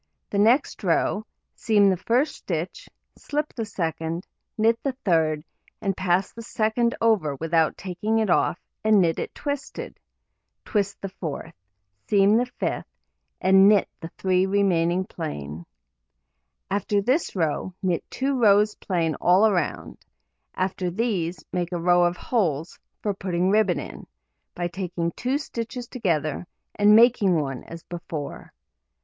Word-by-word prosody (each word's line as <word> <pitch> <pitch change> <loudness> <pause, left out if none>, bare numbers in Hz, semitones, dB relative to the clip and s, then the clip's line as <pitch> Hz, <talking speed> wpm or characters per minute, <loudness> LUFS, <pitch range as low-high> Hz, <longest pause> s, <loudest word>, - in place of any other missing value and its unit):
The 200 - 0
next 235 +4 +3
row: 200 +4 +1 0.3
seam 205 -3 +3
the - - +2
first 240 - +1
stitch, - - -5 0.3
slip 300 +1 -3
the 225 - -3
second, 165 -2 -3 0.3
knit 225 +1 +3
the 275 - -1
third, 160 -4 +2 0.4
and 195 -3 -1
pass 185 0 0
the 230 - -8
second 230 +1 0
over 200 -11 +2
without 160 +2 +1
taking 210 +4 -2
it 220 -1 +2
off, 175 0 +2 0.2
and 215 -1 +5
knit 165 -3 +2
it - - -5
twisted; 285 -1 -5 0.7
twist 200 -3 -1
the 195 - -3
fourth, 165 -6 -6 0.5
seam 200 +1 +4
the 245 +2 +2
fifth, 250 - -3 0.5
and 190 +1 +6
knit 205 -2 +4
the 165 - -6
3 185 0 +2
remaining 185 -2 +2
plain. 80 - -6 1.0
After 205 +1 +1
this 255 - 0
row, 165 +1 -1
knit 180 -3 0
2 270 +1 -1
rows 210 -1 +5
plain 170 -6 -1
all 195 +5 +5
round; 175 -6 -2 0.6
after 185 -1 -1
these, 180 -4 -2
make 175 -1 -1
a 175 - -1
row 175 +1 +4
of 175 +1 0
holes 165 - -1 0.2
(for 205 - 0
putting 185 -1 0
ribbon 205 -4 +3
in) - - -9 0.5
by 175 0 -1
taking 175 -2 -3
2 255 +8 -1
stitches 240 -3 -5
together, 170 - -1 0.3
and 210 +1 +5
making 225 -5 +5
one 135 -4 -4
as 165 -1 -10
before. 165 -4 -7
190 Hz, 140 wpm, -24 LUFS, 170-220 Hz, 1.0 s, and